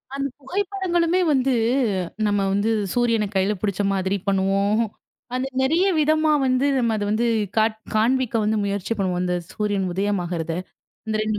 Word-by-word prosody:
அந்த 275 0 -1
புகைப்படங்களுமே 360 +1 0
வந்து 265 -1 +2 0.7
நம்ம 205 -1 +1
வந்து 205 +3 +1 0.2
சூரியன 230 -3 +2
கையில 190 +2 +2
புடிச்ச 205 -2 -1
மாதிரி 190 +1 0
பண்ணுவோம். 195 +2 +2 0.5
அந்த 260 +1 -1
நெறைய 330 +8 +2
விதமா 310 +1 +3
வந்து 255 +1 +2
நம்ம 230 -3 +1
அத 205 - -2
வந்து 235 +3 +1 0.3
காட் 220 0 +2 0.2
காண்பிக்க 245 +2 +2
வந்து 215 +1 +1
முயற்சி 200 +2 -2
பண்ணுவோம், 180 -2 -1
அந்த 180 0 0 0.2
சூரியன் 205 -3 -1
உதயம் 200 0 0
ஆகுறத. 165 -1 -3 0.5
அந்த 215 0 -1
2 215 -1 -1
215 Hz, 150 wpm, -23 LUFS, 200-265 Hz, 0.7 s, விதமா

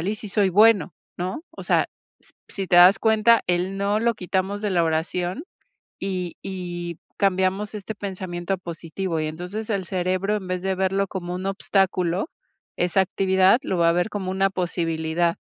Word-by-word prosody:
"Igual 185 - -2
y 210 - 0
sí 210 - -8
soy 200 0 +2
bueno", 210 0 +5 0.2
¿no? 185 - -4
O - - -9
sea, - - +2 0.3
s-si 195 -1 -8
te 180 - +1
das 180 +3 +8
cuenta, 220 +1 +4
el 180 +2 0
"no" 200 +2 +1
lo 235 0 +2
quitamos 190 +2 -2
de 210 - 0
la 175 -2 +2
oración, 175 - -1 0.6
y 185 -3 -3
y 175 -3 -5 0.2
cambiamos 195 +2 +1
este 210 +1 -5
pensamiento 185 -2 -4
a - - -15
positivo. 170 0 -4
Y, 155 - -1
entonces, 180 +8 -5
el 195 -4 -1
cerebro, 185 +3 0
en 190 -2 -8
vez 185 0 -3
de 190 0 0
verlo 190 +1 +1
como 180 -2 -5
un 185 +1 -5
obstáculo, 190 - 0 0.5
esa 180 +2 +2
actividad, 190 +3 +3
lo 190 - -1
va 170 -1 +4
a - - +5
ver 175 +5 0
como 190 -3 -3
una 195 +1 +2
posibilidad. 170 -2 -1
185 Hz, 180 wpm, -24 LUFS, 175-200 Hz, 0.6 s, das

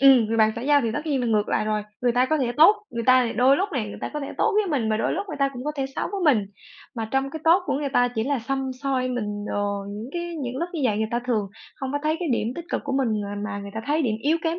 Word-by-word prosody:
Ừm, 265 -4 +7
người 225 +1 -1
bạn 220 -1 +4
xã 235 - -4
giao 290 +1 +4
thì 230 - -1
tất 295 +7 -4
nhiên 285 -4 +1
là 245 - -1
ngược 215 -2 +1
lại - - +1
rồi. 215 0 0 0.2
Người 245 -1 +2
ta 250 +1 +3
có 310 +3 +1
thể 245 -4 0
tốt, 330 +8 +7
người 235 -1 -3
ta 255 -2 +5
đôi 260 +3 +5
thì - - -2
lúc 390 - 0
này 235 -7 -2
người - - -8
ta - - -4
có 300 - -2
thể 280 - -4
tốt 445 - +3
với 425 -1 +3
mình, 275 -10 0
mà 215 - +1
đôi 220 - 0
lúc 395 +3 -3
người - - -5
ta 275 -1 +3
cũng 250 -1 -7
có 300 - -1
thể 270 -1 -1
xấu - - -1
với 400 - -2
mình, 210 -3 -1 0.5
mà 225 -2 -4
trong 270 +1 0
cái 315 - -6
tốt 345 +3 +5
của - - 0
người 285 0 -1
ta 245 -2 +3
chỉ 225 -2 -2
là 280 0 0
săm 265 +3 -2
soi 260 -2 0
mình 210 -4 -3
đồ, 200 -1 -1
những 210 +4 -6
cái 345 - -2 0.2
những 250 0 -4
lúc 340 +6 -2
như 320 - -2
vậy 215 -4 +2
người 220 0 0
ta 235 - 0
thường 220 -5 +1 0.3
hông 265 0 -3
có 290 - 0
thấy 310 +1 +1
cái 345 - -1
điểm 230 - 0
tích 340 - -6
cực - - -1
của 280 - -3
mình, 265 -2 +1 0.2
à, 200 - -5
mà 205 -1 -4
người 200 0 -7
ta 220 - -3
thấy 305 +2 +1
điểm 230 -6 +1
yếu 310 +4 +3
kém 330 +1 -1
255 Hz, 330 wpm, -24 LUFS, 220-290 Hz, 0.5 s, Ừm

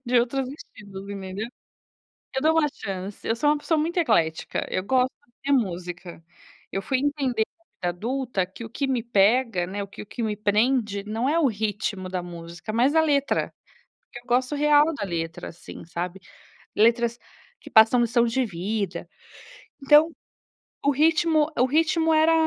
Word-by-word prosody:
de 245 0 +4
outros 255 +2 -1
estilos, 200 -8 -11
entendeu. 195 +1 -5 0.9
Eu 265 - -1
dou 315 +1 +4
uma 310 - +4
chance, 195 0 -6
eu 225 - +1
sou 295 +5 +2
uma 300 - +2
pessoa 300 +2 0
muito 325 +4 -1
eclética, 220 - +1
eu 185 - -1
gosto 255 +5 +1 0.3
de 280 - +1
música. 175 -7 -2 0.5
Eu 195 - -2
fui 260 +6 0
entender 270 -5 0
na 335 - -39 0.3
vida - - -17
adulta, 245 -3 -1
que 190 +5 -10
o 225 - -9
que 275 +5 -2
me 255 -3 0
pega, 225 -3 +2
né, 200 +3 -4
o - - -5
que 195 - -10
o - - -11
que 235 - -6
me 215 -2 -1
prende 210 0 +1
não 225 +5 -1
é 315 +3 +2
o 325 - +4
ritmo 205 -4 -2
da 185 -1 -3
música, 170 +2 -8
mas 250 +6 +3
a 320 - +6
letra. 280 -3 +1 0.6
Eu 240 - -7
gosto 250 +3 +1
real 295 0 +5
da 275 - -4
letra, 165 -3 -4
assim, 170 - -11
sabe. 175 +3 -5 0.6
Letras 235 +2 +3 0.4
que - - -13
passam 225 +3 +6
lição 235 0 +3
de 240 +3 +1
vida. 195 -2 -3 0.8
Então, 300 +4 +6 0.7
o 285 - +4
ritmo 310 +1 +3
o 250 - +4
ritmo 320 +3 +2
era 315 +1 +5
230 Hz, 170 wpm, -25 LUFS, 195-280 Hz, 0.9 s, a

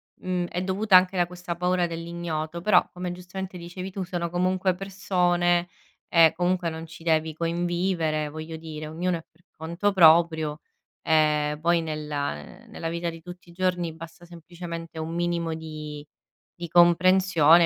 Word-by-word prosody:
mhmm, 180 -1 -2
è 180 +1 -3
dovuta 195 +1 +2
anche 185 +1 +6
da 175 -1 +2
questa 175 -1 -6
paura 180 0 +1
dell'ignoto 170 -1 -4
però, 185 -2 +4
come 180 0 -5
giustamente 180 +1 -7
dicevi 180 +2 -7
tu, 190 0 -4
sono 175 -1 -3
comunque 185 +1 +1
persone 180 -2 +1 0.4
e 165 -2 +6
comunque 175 0 0
non 160 0 -7
ci 160 0 -13
devi 160 -1 +1
convivere 170 -2 -1
voglio 155 +1 -7
dire, 155 -1 -7
ognuno 170 +2 -1
è - - -16
per 170 +2 -31
conto 170 +6 -1
proprio, 160 -3 +5 0.4
ehm, 150 -1 +2
poi 170 0 +3
nella, 150 - -3 0.2
ehm, - - -19
nella 165 - -4
vita 170 0 -2
di 165 0 -11
tutti 175 0 -12
i - - -13
giorni 180 -2 -1
basta 165 +2 -11
semplicemente 170 -1 -8
un 160 +1 -4
minimo 170 -1 -1
di 155 -2 -7 0.5
di 170 -1 -6
comprensione 175 -1 +5
170 Hz, 155 wpm, -26 LUFS, 160-180 Hz, 0.5 s, anche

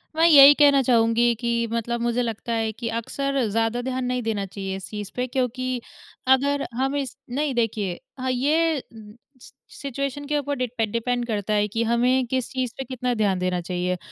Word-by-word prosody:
मैं 325 +1 +4
यही 285 -3 +10
कहना 285 -2 +5
चाहूँगी 235 -1 +3
कि 235 -1 0
मतलब 235 +1 -2
मुझे 240 +1 0
लगता 230 0 -4
है 225 -1 0
कि 230 +1 -5
अक्सर 275 +4 -2
ज़्यादा 225 +3 0
ध्यान 255 0 -3
नहीं 250 0 -1
देना 210 -3 -1
चाहिए 195 0 -5
इस 190 - -8
चीज़ 210 -2 -6
पे 250 - -1
क्योंकि 255 0 -2 0.5
अगर 280 +2 +3
हम 270 +3 -1
इस 275 -3 -3
नहीं, 280 +3 -1
देखिए 210 -6 -1 0.2
हाँ, 260 0 -1
ये 300 +4 +1 0.6
सि - - -15 0.3
सिचुएशन 275 +1 -4
के 295 0 0
ऊपर 285 0 -3
डिड 235 -3 -2
डिपेंड 240 +1 -1
करता 215 -2 -2
है 210 0 +2
कि 225 +3 -1
हमें 245 +3 +2
किस 255 0 -2
चीज़ 255 -3 -2
पे 270 - -3
कितना 250 -1 -2
ध्यान 205 -5 +1
देना 180 0 0
चाहिए। 180 +1 -2
245 Hz, 185 wpm, -24 LUFS, 225-265 Hz, 0.6 s, यही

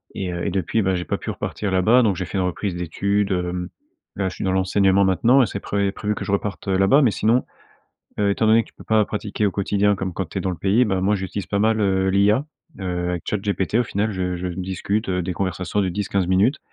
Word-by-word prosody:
et 90 -2 -3
heu, 85 - -3
et - - +1
depuis, 95 +4 0
bah, 95 -2 +1
j'ai 90 0 -3
pas - - -2
pu - - -7
repartir 100 -2 -3
là-bas, 105 +7 +4
donc 100 -5 +1
j'ai 90 - -3
fait 95 - -5
une 95 - +1
reprise 90 +1 -2
d'études, 100 +4 -1
hem, 90 -1 -2 0.5
là 95 - 0
je 90 - -5
suis - - -5
dans 95 - +1
l'enseignement 95 +1 +3
maintenant 115 +9 +4
et - - +4
c'est 100 -1 -5
pré 100 -1 -1
prévu 105 0 -2
que - - -5
je - - -3
reparte, 100 0 -3
heu, 95 -1 +2
là-bas, 95 +10 +5
mais 125 -6 +4
sinon, 115 +5 +1 0.7
heu, 105 -1 +2
étant 110 +2 +1
donné 110 +1 +5
que - - -15
tu - - -23
peux - - -14
pas 110 -2 +2
pratiquer 105 0 -2
au - - +1
quotidien 100 +1 +1
comme 95 -1 -3
quand 95 +1 -3
tu - - -12
es - - 0
dans 95 - -1
le 90 - -4
pays, 100 +8 +3
bah, 95 -4 0
moi 100 +3 +2
j'utilise 95 0 -4
pas 100 - -1
mal, 110 +1 +2
heu, 95 -1 +2
l'IA, 105 +7 +3 0.4
heu, 90 -2 -2
avec 90 -1 -3
ChatGPT 100 0 -1
au 120 - +4
final 105 0 -1
je 90 -1 -2
je 90 +1 -4
discute, 95 +4 -3
heu, 90 -1 0
des 90 - -3
conversations 95 +2 -2
de 95 - +1
10-15 100 0 -1
minutes, 100 - +2
95 Hz, 260 wpm, -22 LUFS, 95-105 Hz, 0.7 s, là-bas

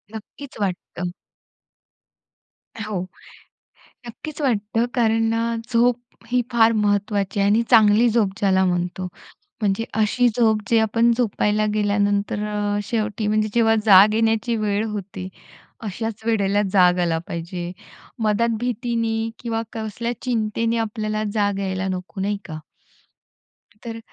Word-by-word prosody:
नक्कीच 260 +5 -10
वाटतं. 180 -2 -3 1.7
अ, 225 - -7
हो. 195 -4 -2 1.1
नक्कीच 305 +6 -8
वाटतं 225 -2 0
कारण 225 -2 +2
ना 230 +1 0 0.2
झोप 240 +1 +3 0.3
ही 250 -1 +3
फार 230 -1 +5
महत्त्वाची 205 -1 0
आहे 200 - +3
आणि 225 +3 +4
चांगली 225 0 +6
झोप 220 -3 +2
ज्याला 190 -3 +3
म्हणतो. 180 0 -1 0.5
म्हणजे 205 +1 0
अशी 220 +3 +2
झोप 220 -3 +3
जे 230 - +5
आपण 230 +2 +3
झोपायला 215 -2 +1
गेल्यानंतर 205 0 0
अ, 205 -1 -1
शेवटी 215 -1 -2
म्हणजे 215 0 +1
जेव्हा 225 -1 +4
जाग 205 +1 +8
येण्याची 225 +1 +1
वेळ 210 -1 0
होती 195 -2 -6 0.6
अशाच 220 +2 -4
वेळेला 205 -3 +2
जाग 180 -2 +5
आला 165 -2 +1
पाहिजे, 175 0 -5 0.5
मद्यात 220 +2 +2
भीतीने 230 -2 -1
किंवा 225 -1 -2
कसल्या 225 +2 -4
चिंतेने 230 -1 0
आपल्याला 215 -1 -2
जाग 205 -2 +1
यायला 190 -1 -2
नको, 185 +1 -5
नाही 205 +1 0
का. 160 -3 -7 1.3
तर 230 -1 -6
215 Hz, 125 wpm, -22 LUFS, 200-230 Hz, 1.7 s, जाग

